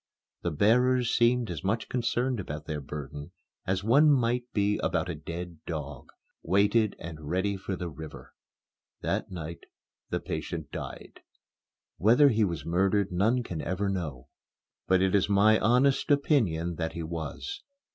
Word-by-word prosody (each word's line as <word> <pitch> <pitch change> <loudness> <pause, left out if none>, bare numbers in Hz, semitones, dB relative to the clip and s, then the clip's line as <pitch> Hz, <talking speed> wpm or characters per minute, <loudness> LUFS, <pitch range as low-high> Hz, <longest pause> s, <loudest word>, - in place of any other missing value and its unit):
The 85 - -1
bearers 120 +8 +3
seemed 120 -2 +3
as 80 -5 -5
much 110 +4 -1
concerned 125 0 0
about 75 -5 -6
their 75 -1 -4
burden 75 +1 -7 0.3
as 95 +1 0
one 140 +8 +5
might 125 -2 +1
be 105 0 +1
about - - 0
a - - -1
dead 85 -1 -7
dog, 75 -5 -5 0.3
weighted 100 +4 +2
and 80 -2 -8
ready 95 +3 0
for 95 0 -4
the 90 -1 -4
river. 80 -1 -10 0.7
That - - -1
night 85 -2 -7 0.4
the - - -1
patient - - -5
died. - - -7 0.8
Whether 120 +9 +6
he 110 -3 +2
was 85 -7 -2
murdered 95 +3 +1
none 110 +8 +2
can 85 -8 -5
ever 100 +2 -1
know. 80 -10 -4 0.6
But 95 0 +4
it 95 - +2
is 100 0 +3
my 105 +2 +5
honest 130 +6 +3
opinion 100 - +2
that 80 -1 -2
he 85 - -4
was. 85 - -5
95 Hz, 150 wpm, -28 LUFS, 85-115 Hz, 0.8 s, Whether